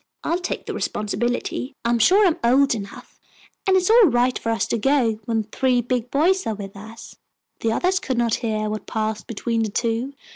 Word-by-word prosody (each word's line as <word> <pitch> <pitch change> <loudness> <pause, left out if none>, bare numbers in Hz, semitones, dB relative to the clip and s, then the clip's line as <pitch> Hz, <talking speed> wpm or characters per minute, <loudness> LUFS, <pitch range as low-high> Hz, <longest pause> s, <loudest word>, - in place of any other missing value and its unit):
I'll 340 +2 0
take 365 - -4
the - - -4
responsibility. 240 +4 -2
I'm 235 0 +2
sure 390 - +5
I - - +6
am 320 - -3
old 265 +3 +4
enough, 200 -3 -9 0.5
and 380 0 +5
it's 370 +3 +2
all 465 -1 +7
right 250 -2 +1
for 230 - -3
us 225 - 0
to 230 - 0
go 240 -4 +2
when 225 -2 0
three 250 +4 +1
big 245 0 -2
boys 355 +6 +2
are 220 - -1
with 200 -1 -8
us." 220 +3 -11 0.4
The 225 - 0
others 365 +10 +1
could 260 -8 -3
not 235 -2 +1
hear 215 -2 -1
what 215 0 -5
passed 215 -1 -3
between 230 +1 -2
the 220 - -1
two. 230 +5 -2
235 Hz, 205 wpm, -22 LUFS, 220-275 Hz, 0.5 s, all